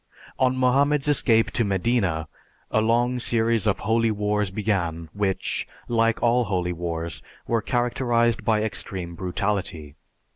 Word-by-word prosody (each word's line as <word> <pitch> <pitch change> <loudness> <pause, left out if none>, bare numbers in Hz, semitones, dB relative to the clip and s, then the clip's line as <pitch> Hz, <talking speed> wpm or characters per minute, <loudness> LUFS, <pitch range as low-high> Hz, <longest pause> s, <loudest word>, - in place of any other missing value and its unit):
On 130 0 +2
Mohammed's 140 +3 +2
escape 115 -6 +3
to 115 - +1
Medina, 95 -5 0 0.4
a 110 - +3
long 120 +3 +2
series 115 -2 +1
of 100 - +1
holy 115 +2 +2
wars 105 -1 0
began 90 -6 -2
which, 100 -2 -2 0.2
like 115 -1 +1
all 120 +1 +3
holy 90 -3 -1
wars, 85 -1 -4 0.2
were 115 -1 0
characterized 120 0 +1
by 110 -2 +2
extreme 95 -5 -3
brutality. 90 -4 -3
110 Hz, 130 wpm, -24 LUFS, 95-120 Hz, 0.4 s, escape